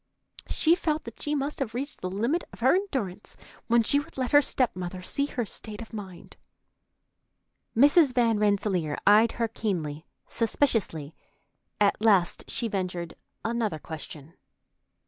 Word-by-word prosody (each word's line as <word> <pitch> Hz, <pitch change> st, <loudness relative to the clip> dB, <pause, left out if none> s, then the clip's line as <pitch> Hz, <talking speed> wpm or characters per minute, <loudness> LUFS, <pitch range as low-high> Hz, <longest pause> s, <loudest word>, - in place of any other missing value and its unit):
She 325 Hz, -, +4 dB
felt 315 Hz, -3 st, 0 dB
that -, -, -10 dB
she 300 Hz, -1 st, -1 dB
must 285 Hz, +1 st, -2 dB
have 235 Hz, -5 st, -3 dB
reached 280 Hz, +4 st, -4 dB
the 185 Hz, -, -3 dB
limit 235 Hz, -, 0 dB
of -, -, -14 dB
her 260 Hz, +3 st, +5 dB
endurance 265 Hz, -, -3 dB, 0.3 s
when 235 Hz, 0 st, +4 dB
she 285 Hz, +5 st, +3 dB
would 290 Hz, -, -10 dB
let 255 Hz, -2 st, -1 dB
her 290 Hz, -, +7 dB
step 255 Hz, -6 st, +1 dB
mother 180 Hz, 0 st, -5 dB
see 280 Hz, +9 st, 0 dB
her 245 Hz, -5 st, -3 dB
state 210 Hz, +1 st, -8 dB
of 225 Hz, -, -10 dB
mind. 190 Hz, -5 st, -9 dB, 1.4 s
Mrs. 290 Hz, +3 st, +6 dB
Van 230 Hz, -4 st, +2 dB
Rensselaer 200 Hz, -7 st, +1 dB
eyed 215 Hz, +3 st, +6 dB
her 230 Hz, -1 st, 0 dB
keenly, 170 Hz, -9 st, -3 dB, 0.2 s
suspiciously. 220 Hz, -, 0 dB, 0.7 s
At 205 Hz, 0 st, +2 dB
last 195 Hz, -6 st, +3 dB
she 235 Hz, -, -2 dB
ventured 180 Hz, -5 st, -3 dB, 0.3 s
another 225 Hz, -6 st, -1 dB
question. 155 Hz, -1 st, -9 dB
220 Hz, 145 wpm, -27 LUFS, 185-265 Hz, 1.4 s, her